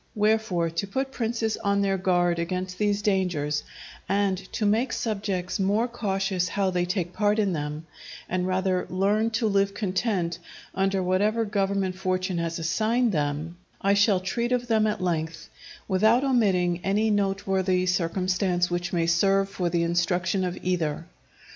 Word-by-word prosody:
Wherefore, 210 Hz, -6 st, +1 dB
to 170 Hz, +5 st, -2 dB
put 265 Hz, +7 st, -2 dB
princes 225 Hz, -3 st, -1 dB
on 200 Hz, 0 st, +1 dB
their 195 Hz, -1 st, 0 dB
guard 175 Hz, -2 st, +2 dB
against 185 Hz, +2 st, -3 dB
these 205 Hz, -1 st, +1 dB
dangers, 175 Hz, -8 st, 0 dB, 0.5 s
and 200 Hz, 0 st, +2 dB, 0.2 s
to 215 Hz, -, -1 dB
make 225 Hz, +5 st, +1 dB
subjects 195 Hz, -5 st, -2 dB
more 205 Hz, +5 st, +2 dB
cautious 195 Hz, -5 st, -1 dB
how 195 Hz, 0 st, 0 dB
they 180 Hz, -1 st, 0 dB
take 180 Hz, -1 st, -2 dB
part 210 Hz, 0 st, +1 dB
in 200 Hz, -4 st, +1 dB
them, 150 Hz, 0 st, -4 dB, 0.4 s
and 180 Hz, 0 st, -1 dB
rather 185 Hz, 0 st, 0 dB
learn 205 Hz, +4 st, +1 dB
to 225 Hz, -, +1 dB
live 200 Hz, -1 st, +1 dB
content 190 Hz, -4 st, -1 dB, 0.3 s
under 195 Hz, 0 st, 0 dB
whatever 210 Hz, +5 st, +1 dB
government 195 Hz, -2 st, 0 dB
fortune 185 Hz, -1 st, -1 dB
has 165 Hz, 0 st, -2 dB
assigned 220 Hz, +9 st, +1 dB
them, 155 Hz, +1 st, -2 dB, 0.2 s
I 200 Hz, 0 st, +2 dB
shall 200 Hz, -2 st, +3 dB
treat 235 Hz, +6 st, -2 dB
of 250 Hz, -1 st, +1 dB
them 220 Hz, -2 st, +3 dB
at 210 Hz, -2 st, -2 dB
length, 165 Hz, -2 st, -2 dB, 0.4 s
without 220 Hz, +6 st, +3 dB
omitting 190 Hz, -9 st, +2 dB
any 210 Hz, +3 st, +1 dB
noteworthy 195 Hz, -2 st, +1 dB
circumstance 180 Hz, 0 st, 0 dB
which 175 Hz, 0 st, -2 dB
may 170 Hz, -2 st, +1 dB
serve 195 Hz, +3 st, +2 dB
for 180 Hz, -3 st, -2 dB
the 170 Hz, -1 st, +1 dB
instruction 175 Hz, +2 st, 0 dB
of 180 Hz, -1 st, -3 dB
either. 165 Hz, -3 st, -1 dB
190 Hz, 155 wpm, -26 LUFS, 175-205 Hz, 0.5 s, shall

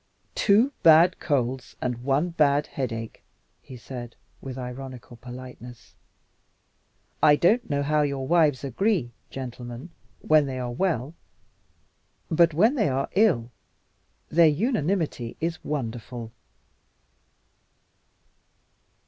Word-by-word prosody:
"Two 225 Hz, +7 st, +3 dB
bad 165 Hz, +3 st, +6 dB
colds 130 Hz, -3 st, -2 dB
and 125 Hz, -1 st, -3 dB
one 140 Hz, +6 st, +1 dB
bad 150 Hz, -3 st, +2 dB
headache," 115 Hz, -4 st, -5 dB, 0.4 s
he 130 Hz, -, -11 dB
said, 120 Hz, -1 st, -8 dB, 0.3 s
with 130 Hz, -1 st, -7 dB
ironical 125 Hz, -1 st, -8 dB
politeness. 125 Hz, -1 st, -11 dB, 1.3 s
"I 150 Hz, -, +7 dB
don't 220 Hz, +9 st, +2 dB
know 140 Hz, -1 st, 0 dB
how 150 Hz, +1 st, +2 dB
your 140 Hz, -2 st, -1 dB
wives 155 Hz, -4 st, +3 dB
agree, 145 Hz, -, 0 dB, 0.2 s
gentlemen, 125 Hz, +3 st, -7 dB, 0.3 s
when 155 Hz, -2 st, +4 dB
they 130 Hz, -1 st, -4 dB
are 125 Hz, -1 st, -3 dB
well. 150 Hz, -1 st, -1 dB, 1.2 s
But 170 Hz, +1 st, +5 dB
when 210 Hz, -, +3 dB
they 210 Hz, -, +2 dB
are 135 Hz, +1 st, -1 dB
ill, 170 Hz, -, +2 dB, 0.8 s
their 165 Hz, +1 st, +5 dB
unanimity 165 Hz, -, -1 dB
is 165 Hz, 0 st, -3 dB
wonderful!" 120 Hz, -4 st, -5 dB
140 Hz, 105 wpm, -25 LUFS, 125-165 Hz, 1.3 s, I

